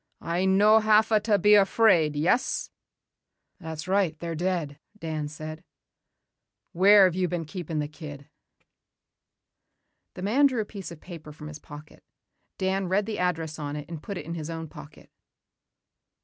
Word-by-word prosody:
I 175 +3 -1
no 205 +3 +5
hava 215 0 +4
ta 210 -1 +2
be 210 +1 +4
afraid, 195 -6 +4
yes?" 170 - 0 0.9
"That's 160 0 -7
right, 185 -4 +1
they're 170 +1 -5
dead," 165 -4 -2 0.2
Dan 155 -5 -4
said. 155 +1 -8 1.1
"Where 200 +3 +6
have 185 -2 +4
they 185 0 0
been 175 -2 -3
keeping 165 -1 -6
the 150 -1 -1
kid?" 145 -2 -10 1.9
The 180 - -7
man 260 +9 +4
drew 255 -4 -2
a - - -4
piece 200 -3 -8
of 170 - -11
paper 165 -4 -10
from 150 0 -10
his 150 0 -9
pocket. 150 +1 -13 0.5
Dan 190 0 -1
read 195 +3 +1
the 220 0 -4
address 165 -3 -2
on 145 -1 -4
it 150 0 -7
and 165 -3 -8
put 200 +2 -6
it - - -7
in 165 - -5
his 160 -2 -5
own 165 -1 -5
pocket. 145 0 -14
170 Hz, 160 wpm, -26 LUFS, 155-200 Hz, 1.9 s, Where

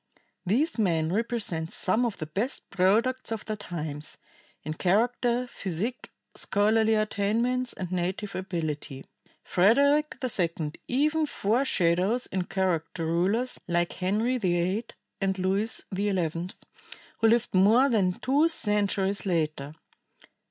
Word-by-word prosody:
These 260 - +1
men 165 -5 +1
represent 205 -7 -2
some 220 +6 +1
of 225 - -5
the 155 - -4
best 200 - -3
products 215 +8 +2
of 220 -1 -3
their 215 - -3
times, 155 -7 -6 0.5
in 155 - -3
character, 235 +7 +1
physique, 215 +2 -4 0.2
scholarly 220 +2 +2
attainments 225 +4 0
and 185 -2 -6
native 185 +3 -2
ability. 155 -7 -4 0.4
Frederick 280 - +3
II 170 -10 -1 0.2
even 305 +4 +1
foreshadows 205 -3 +1
in 185 -2 -2
character 175 -3 -1
rulers 195 +10 0
like 175 -1 0
Henry 215 +7 0
VIII 185 +3 0 0.4
and 195 0 0
Louis 195 +4 0
XI, 180 -4 -1 0.7
who 225 - +4
lived 235 +1 +2
more 215 +8 +5
than 205 -8 +2
two 280 - +2
centuries 205 -7 0
later. 155 -4 -1
200 Hz, 115 wpm, -27 LUFS, 175-235 Hz, 0.7 s, more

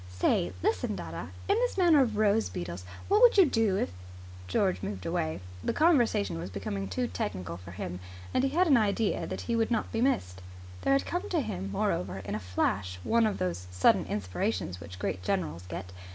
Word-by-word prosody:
"Say, 90 -1 +1
listen, 90 +3 0
dadda, 85 -2 -6 0.2
in 400 - +4
this - - 0
matter 345 -5 +6
of 225 -5 0
rose 215 +1 +3
beetles, 85 +1 -5 0.2
what 415 +3 +4
would 485 -3 +7
you 385 - +9
do 225 -8 +2
if 90 - -1 0.3
" 90 0 -15
George 185 - +1
moved 95 -3 -5
away. 80 +3 -1 0.2
The - - 0
conversation 240 - +3
was 90 +3 -5
becoming 100 0 -4
too 95 +7 -1
technical 90 -4 -4
for 90 -1 -11
him, 90 0 -5 0.3
and 255 - +2
he 270 - +3
had 345 +6 +3
an 285 -7 +5
idea 215 0 +1
that - - -4
he 235 - -1
would 225 -1 +1
not 230 -3 -1
be 225 - -1
missed. 95 - 0 0.4
There 275 - +3
had 275 - +2
come 355 - -3
to 335 -4 +1
him, 195 -5 -4
moreover, 190 - -1
in 100 - -4
a 105 - -1
flash 90 -1 -1
one 230 -1 +3
of 210 - -2
those 90 0 -3
sudden 90 0 +3
inspirations 95 -1 -2
which 90 +1 -9
great 95 0 -2
generals 85 -1 -2
get. 90 +1 -6
100 Hz, 205 wpm, -29 LUFS, -, 0.4 s, you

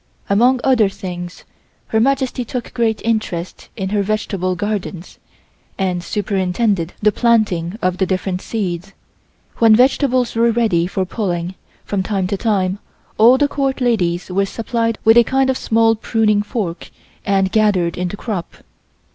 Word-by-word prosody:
Amongst 245 +5 +3
other 240 -7 +4
things 180 -3 -7 0.5
Her 220 - +2
Majesty 265 0 +1
took 240 +1 -6
great 230 -3 0
interest 215 -6 -3
in 190 -3 -3
her 205 0 +1
vegetable 195 -3 -1
gardens, 195 -2 -4 0.6
and 180 -3 -1
superintended 195 -2 -1
the 210 - +5
planting 210 -6 +1
of 185 0 0
the 190 - +1
different 185 0 -2
seeds. 195 -3 -4 0.6
When 225 -2 +6
vegetables 255 0 +2
were 230 +1 +3
ready 220 -8 +1
for 190 0 -2
pulling, 180 -3 -3 0.3
from 200 -2 -1
time 190 -1 -1
to 200 +2 -1
time, 195 -3 0 0.4
all 240 +4 +7
the 290 - +3
Court 275 -2 -1
ladies 180 -8 0
were 195 +2 +1
supplied 230 +1 -2
with 225 +1 +6
a 235 - +8
kind 265 +2 +1
of - - -2
small 225 0 +3
pruning 215 -1 +1
fork 205 -5 -4 0.3
and 195 -1 +1
gathered 200 -6 +2
in 180 0 -2
the 205 - -6
crop. 200 -7 -5
210 Hz, 150 wpm, -18 LUFS, 185-230 Hz, 0.6 s, a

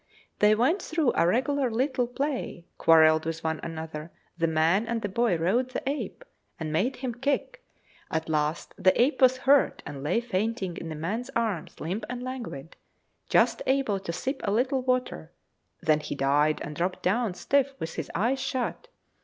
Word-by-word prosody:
They 210 +1 +5
went 270 - +2
through 315 -6 +1
a 165 - +3
regular 260 +6 +1
little 250 +2 0
play, 255 - -3
quarrelled 160 -1 +6
with 165 0 -4
one 160 -1 -1
another; 160 -1 -6 0.2
the 165 -1 +1
man 165 +7 +2
and 230 -1 -2
the - - 0
boy 225 -2 +1
rode 215 +10 +1
the 255 - -5
ape, 295 - -3 0.3
and 155 -2 -3
made 235 +12 +1
him 255 -2 -4
kick; 285 - -2 0.5
at 160 0 -2
last 155 +1 -1
the 185 - +4
ape 270 +5 +3
was 255 0 +6
hurt, 275 0 +4
and 140 -2 -7
lay 165 +10 +1
fainting 215 -4 -2
in 165 - -6
the 155 - -5
man's 210 - -3
arms, 220 -8 -2
limp 190 +7 -3
and 250 0 -5
languid, 235 - -6 0.5
just - - +3
able 265 -7 +1
to 190 -3 -5
sip 265 - -3
a - - 0
little 255 +5 +1
water; 255 - -1 0.5
then 155 -1 +3
he 150 - -5
died, 145 +3 +2
and 150 - -6
dropped 180 +4 -2
down 205 0 +1
stiff, 275 +5 +1
with 160 -7 -5
his 160 - -5
eyes 240 +8 +1
shut. 260 - -3
215 Hz, 180 wpm, -27 LUFS, 160-255 Hz, 0.5 s, quarrelled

